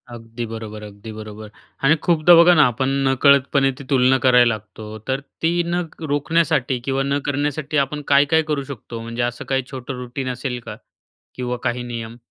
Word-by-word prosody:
अगदी 115 +1 -7
बरोबर, 110 -1 -7
अगदी 105 +1 -10
बरोबर. 110 0 -9 0.3
आणि 145 +4 +5
खूपदा 170 0 +5
बघा 170 +1 +7
ना, 155 - +6
आपण 130 +3 -1 0.2
नकळतपणे 135 0 +3
ती - - -8
तुलना 130 -1 +4
करायला 125 -1 +6
लागतो, 110 0 -9
तर 135 0 0 0.2
ती 165 - +2
न 175 +1 -1 0.3
रोखण्यासाठी 145 -2 +1
किंवा 135 0 0
न 140 +1 0
करण्यासाठी 145 +1 -1
आपण 150 +2 -6
काय-काय 145 +3 +4
करू 145 -2 -1
शकतो? 115 -2 -8
म्हणजे, 115 +1 -5
असं 120 0 -3
काही 135 -1 +1
छोटं 130 0 -6
रूटीन 130 +1 -5
असेल 125 0 -4
का? 110 -2 -7 0.6
किंवा 125 -1 -3
काही 125 -1 -1
नियम? 115 -1 -6
130 Hz, 170 wpm, -21 LUFS, 115-140 Hz, 0.6 s, बघा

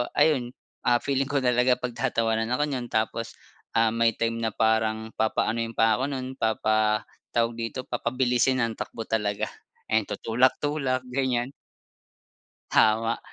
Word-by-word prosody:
ayun, 130 -6 +2 0.3
ah, 120 -1 +4
feeling 135 -1 0
ko 140 -2 0
talaga 125 +1 +4
pagtatawanan 115 -2 -1
ako 145 - +1
niyan 125 -3 -3
tapos, 110 +1 -2 0.4
ah, 115 -1 +4
may 115 0 +2
time 115 0 -1
na 110 -2 -1
parang 110 0 +1
papaanuhin 115 +1 0
pa 110 -1 +4
ako - - -1
nun, 130 -1 -5
papa 110 0 +1 0.3
tawag 115 0 +1
dito 115 +3 -4
papabilisin 125 +1 +1
ang 115 -1 -2
takbo 120 -2 -5
talaga 105 -2 -1 0.4
and 110 -2 +2
tutulak-tulak, 130 +2 +1
ganyan. 130 -1 0 1.2
Tama, 115 +1 +3
115 Hz, 130 wpm, -26 LUFS, 110-130 Hz, 1.2 s, ah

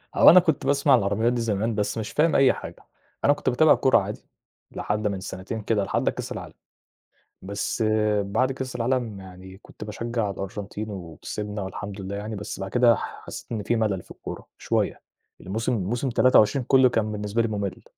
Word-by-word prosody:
هو - - +8
أنا 185 - +9
كنت 160 -4 0
باسمع 140 0 +3
عن - - +6
العربيات 105 +4 +1
دي 120 - -1
زمان، 110 0 -1
بس 105 +2 -1
مش 110 -1 -4
فاهم 155 +1 +2
أي 135 -1 +5
حاجة. - - -10 0.4
أنا 145 - +6
كنت 145 - -1
باتابع 150 +5 +5
الكورة 130 - +4
عادي 105 +1 -3 0.5
لحد 105 +1 -2
من 100 -2 -2
سنتين 95 +4 -6
كده، 105 -1 0
لحد - - 0
كاس - - -6
العالم، - - -7 0.9
بس 100 +3 -2 0.4
بعد 110 +7 0
كاس 130 -1 -5
العالم 120 -4 -1
يعني 95 0 -12
كنت 105 - -12
باشجع 115 0 -3
الأرجنتين 100 +2 -5
وكسبنا 105 +3 -6
والحمد 100 +1 -6
لله 95 +1 -5
يعني 105 +2 -5
بس 100 -1 -6
بعد 95 0 -5
كده 120 -2 +5
ح - - -7
حسيت - - -9
إن 105 -3 -2
في 120 - +1
ملل 105 -5 0
في - - -17
الكورة - - -8
شوية، - - -1 0.4
الموسم 110 +6 -2
موسم 115 +5 -1
23 125 +1 +4
كلّه 130 -1 +6
كان 110 -3 0
بالنسبة 105 +2 -1
لي 115 - +1
ممل. 100 -2 -4
110 Hz, 185 wpm, -25 LUFS, 100-120 Hz, 0.9 s, أنا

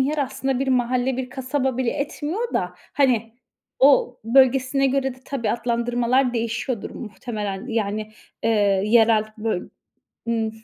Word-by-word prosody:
yer 295 +3 0
aslında 270 -1 -1
bir 270 0 -1
mahalle, 250 0 +1
bir 255 -1 -4
kasaba 265 0 -1
bile 250 -2 0
etmiyor 300 +10 -3
da, - - -1 0.2
hani, 235 -5 +2 0.5
o 260 -2 +4
bölgesine 265 +2 +4
göre 270 -1 0
de 255 - -19
tabii 235 -6 -2
adlandırmalar 240 +2 +1
değişiyordur 230 0 -2
muhtemelen. 210 -2 -5
Yani, 215 -1 -2 0.3
eee, 225 - +2 0.4
yerel 220 -1 +5
bö 215 -4 -1 0.7
ımm, 225 -1 0
245 Hz, 130 wpm, -23 LUFS, 230-265 Hz, 0.7 s, yerel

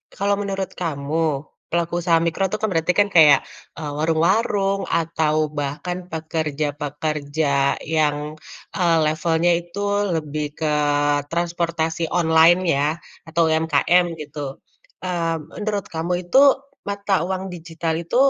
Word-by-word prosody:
Kalau 200 +1 +1
menurut 195 -1 -3
kamu 155 -2 -1 0.2
pelaku 170 0 -1
usaha 170 -1 +3
mikro 180 +3 0
tuh - - 0
kan 220 - +1
berarti 165 +1 +1
kan 205 - +4
kayak, 150 -5 +7 0.3
eee, 150 -2 -5
warung-warung 195 +5 +1
atau 160 -2 0 0.2
bahkan 175 +6 -4
pekerja-pekerja 150 -2 -1
yang, 150 -1 -1 0.4
eee, 170 -3 +3
levelnya 160 +2 +1
itu 175 +3 -9 0.4
lebih 150 -1 -3
ke 155 -2 0 0.5
transportasi 165 -1 -1
online 165 0 +5 0.2
ya 145 +3 +1 0.3
atau 165 +1 0
UMKM 160 +2 +2
gitu, 145 -2 -6 0.5
mmm, 165 -3 -2
menurut 205 -1 -2
kamu 165 +2 -2
itu 215 +10 +4 0.5
mata 200 -4 0
uang 190 0 -3
digital 165 -1 -3
itu 170 +6 -5
165 Hz, 120 wpm, -22 LUFS, 155-175 Hz, 0.5 s, kayak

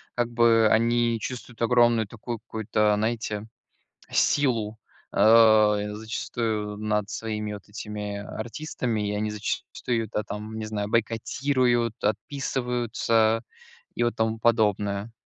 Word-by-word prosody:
как 120 -1 0
бы, 115 -1 +4
они 115 +1 +2
чувствуют 120 0 -7
огромную 120 -2 +4
такую 115 +2 -6
какую-то, 105 -1 0
знаете, 110 -1 -2 0.6
силу, 115 -6 +1 0.3
а, 110 0 +6
э, 105 0 -3
зачастую 110 -1 -3
над 105 -1 -1
своими 105 -2 -4
вот 100 -2 -10
этими 105 -1 -5
артистами, 115 -1 -3
и 105 - -2
они 105 +1 -1
зачастую, 105 +3 -3
да, 105 - -1
там, 105 +1 -6
не 110 - -4
знаю, 105 -1 -3
бойкотируют, 120 +1 +1
отписываются 115 -1 0 0.5
и - - -1
вот 120 0 0
тому 110 0 0
подобное. 105 -2 +1
110 Hz, 120 wpm, -26 LUFS, 105-120 Hz, 0.6 s, а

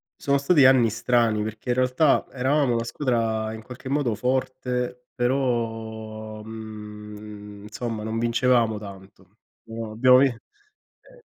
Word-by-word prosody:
sono 140 0 +1
stati 140 -1 +5
anni 130 -4 +6
strani 110 -1 +1
perché 110 +3 -6
in 120 - +2
realtà 130 +4 +3
eravamo 135 0 +1
una 115 0 0
squadra 115 -4 -1
in 110 - -8
qualche 125 +3 -9
modo 135 -5 +1
forte 125 0 -2
però 115 -4 -2
mhmm 110 -1 -9 0.6
insomma 115 0 -4
non 110 +1 -3
vincevamo 115 -1 +2
tanto. 95 -1 -13 0.3
Però 115 -1 -6
abbiamo 125 +3 +6
vin 135 +1 +5
eh. 420 - -18
120 Hz, 125 wpm, -24 LUFS, 110-130 Hz, 0.6 s, anni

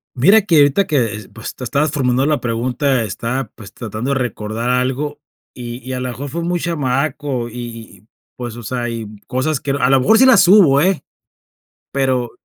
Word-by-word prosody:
Mira 195 - +5
que 185 -5 +2
ahorita 145 +7 +4
que, 115 -8 -1
pues, 115 - -7
tú 125 - -8
estabas 145 +5 0
formulando 130 -2 +1
la 150 -1 +1
pregunta, 125 +2 0
estaba, 115 +6 -3
pues, 100 -4 -12
tratando 115 +3 -5
de 135 - +1
recordar 115 -1 -3
algo, 130 +4 -1 0.3
y 120 -1 -7
y - - -3
a 130 - -3
lo 125 - -3
mejor 130 +4 -6
fue 170 +5 -3
muy 175 +1 -1
chamaco, 140 -4 -1
y - - -13 0.5
y, 105 - -28 0.3
pues, 120 -2 -6
o 120 - -8
sea, 120 +2 -3
y 115 -2 -5 0.2
cosas 135 +3 -1
que, 140 - -4
a 135 -2 +1
lo 135 -1 +5
mejor 220 +12 +4
sí 260 - +6
las 245 -7 +6
hubo, 175 -9 +6
¿eh?, 185 +2 +1 0.9
pero 130 -3 0
130 Hz, 195 wpm, -18 LUFS, 120-150 Hz, 0.9 s, sí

